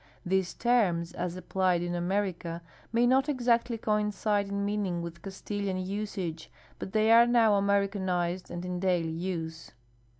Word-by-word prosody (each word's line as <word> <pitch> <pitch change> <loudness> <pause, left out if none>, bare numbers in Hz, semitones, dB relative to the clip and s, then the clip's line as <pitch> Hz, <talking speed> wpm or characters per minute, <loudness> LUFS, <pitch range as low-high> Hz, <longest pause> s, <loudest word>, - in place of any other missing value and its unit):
These 190 0 0
terms, 190 -9 +1
as 175 0 -3
applied 185 -1 0
in 175 0 -3
America, 175 -2 -2 0.3
may 235 +1 +3
not 265 +4 +3
exactly 240 -3 +1
coincide 210 -1 0
in 200 0 -2
meaning 200 -4 -1
with 170 0 -8
Castilian 195 0 -4
usage, 185 -4 -4 0.3
but - - -6
they 220 +1 +3
are 235 +1 +7
now 230 -3 +4
Americanized 195 -3 0
and 175 +1 -5
in 180 0 -3
daily 175 -3 +1
use. 165 -1 -4
190 Hz, 140 wpm, -29 LUFS, 175-210 Hz, 0.3 s, are